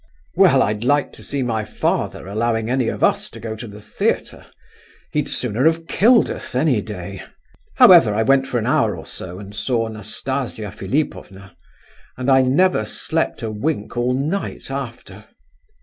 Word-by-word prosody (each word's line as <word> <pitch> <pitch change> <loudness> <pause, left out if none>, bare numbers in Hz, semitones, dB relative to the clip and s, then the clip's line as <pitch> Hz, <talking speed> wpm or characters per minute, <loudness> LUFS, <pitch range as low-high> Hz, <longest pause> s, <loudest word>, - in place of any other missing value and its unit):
Well, - - +5
I'd 105 +1 -2
like 145 +3 +1
to - - -11
see 140 -2 -2
my 110 -3 -1
father 100 - -2
allowing 110 +2 -1
any 130 -2 +1
of - - -3
us - - +2
to - - -11
go 110 -1 -5
to 110 +2 -8
the 105 0 -11
theatre; - - -2 0.6
he'd 150 -1 -1
sooner 125 +2 0
have 165 0 +1
killed 230 +6 +4
us, - - -7
any 130 -4 +2
day. 95 -2 -7 0.5
However, - - +8
I 110 - +2
went 135 +3 +3
for 125 - -1
an 110 - -1
hour - - +1
or - - -9
so 90 0 -8
and 100 +1 -10
saw 115 0 -1
Nastasia 110 +1 -4
Philipovna, 100 - -4 0.6
and 130 +2 0
I 130 0 +6
never 135 +1 +3
slept 105 - -2
a 110 - -2
wink 110 +1 -3
all 120 +1 +1
night 150 +2 -3
after. 115 -6 -7
120 Hz, 165 wpm, -20 LUFS, 105-135 Hz, 0.6 s, However